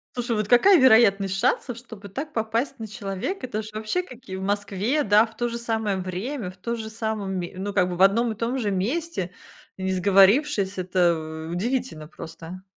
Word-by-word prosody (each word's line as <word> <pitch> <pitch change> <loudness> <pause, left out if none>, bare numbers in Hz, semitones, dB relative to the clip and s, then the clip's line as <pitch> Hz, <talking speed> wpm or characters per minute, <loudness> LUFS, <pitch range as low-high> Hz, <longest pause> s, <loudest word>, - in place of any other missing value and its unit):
Слушай, 235 -3 -1
какая 295 - +6
вероятность 200 -6 +5
шансов, 245 +1 0
чтобы 225 -4 -11
так 290 +10 -6
попасть 230 +4 -1
на 220 - -5
человека? 205 - -4
Это 220 -3 -3
же 215 - -9
вообще 215 +11 -1
какие 250 - -10
в - - -6
Москве, 205 +7 0
да, 210 +2 +5
в 225 -1 -16
то 240 - 0
же 235 0 -4
самое 220 -4 -1
время, 190 +5 -4
в 185 - -14
тоже 220 +3 -4
самом 220 -3 -3
ме 175 -1 -4
ну, 200 +2 -4
как 180 -2 +2
бы 180 - -3
в - - -2
одном 225 +5 +4
и - - -5
том 235 +4 -2
же 215 -5 -1
месте, 200 - -2 0.5
не 190 0 -2
сговорившись. 195 - +3
Это 170 -3 0
удивительно 225 -4 -2
просто! 165 +3 -10
215 Hz, 185 wpm, -24 LUFS, 190-240 Hz, 0.5 s, какая